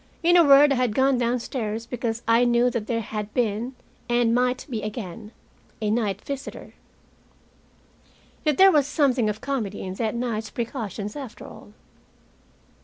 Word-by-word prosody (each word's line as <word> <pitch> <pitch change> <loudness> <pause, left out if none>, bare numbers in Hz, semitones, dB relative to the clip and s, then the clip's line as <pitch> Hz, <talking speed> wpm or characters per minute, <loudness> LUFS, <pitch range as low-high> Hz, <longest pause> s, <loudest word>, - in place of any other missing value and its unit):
In 350 +1 +5
a 345 - +7
word, 285 0 +7
I 275 - +2
had 245 -4 0
gone 265 -1 +3
downstairs, 235 -2 -2
because 235 -1 -4
I 230 +1 +4
knew 240 0 +3
that 230 -3 -3
there 230 -1 -1
had 210 -1 -5
been 235 +2 -1 0.3
and 240 -1 +2
might 250 +1 +1
be 230 -6 -4
again, 210 -2 -6 0.5
a 210 -1 -1
night 210 -3 -1
visitor. 280 -1 -7 1.7
Yet, 300 -3 +1
there 385 0 +8
was 290 -4 +3
something 265 -6 +2
of 210 0 -4
comedy 245 -7 -3
in 185 - -5
that 220 +3 -2
night's 230 -3 -3
precautions, 215 -4 -5
after 265 -6 -8
all. - - -13
235 Hz, 155 wpm, -24 LUFS, 215-260 Hz, 1.7 s, there